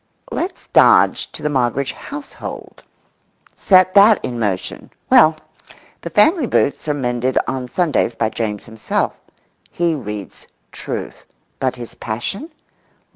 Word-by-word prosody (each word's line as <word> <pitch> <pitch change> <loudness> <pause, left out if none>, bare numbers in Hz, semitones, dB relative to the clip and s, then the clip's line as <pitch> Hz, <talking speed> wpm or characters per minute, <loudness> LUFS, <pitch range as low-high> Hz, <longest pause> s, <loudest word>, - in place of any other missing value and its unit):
Let's 360 +4 -4
dodge - - +4
to - - -10
the 150 - 0
Moggridge 130 0 0
household, 285 0 -9 0.7
set 185 -1 +4
that 205 +1 +7
in 120 -2 -4
motion. 100 -5 -3 0.2
Well, 155 0 +7 0.7
the - - -6
family 320 -6 +3
boots 145 - 0
are 150 - 0
mended 125 -1 -1
on 130 -1 -3
Sundays 145 -5 0
by 110 -1 -1
James 105 -3 -3
himself. 110 -1 -2 0.6
He 170 -1 0
reads 105 -8 -7 0.2
Truth. - - -7 0.3
But 130 -1 -1
his 120 -2 -9
passion? 120 - -5
130 Hz, 125 wpm, -19 LUFS, 115-180 Hz, 0.7 s, that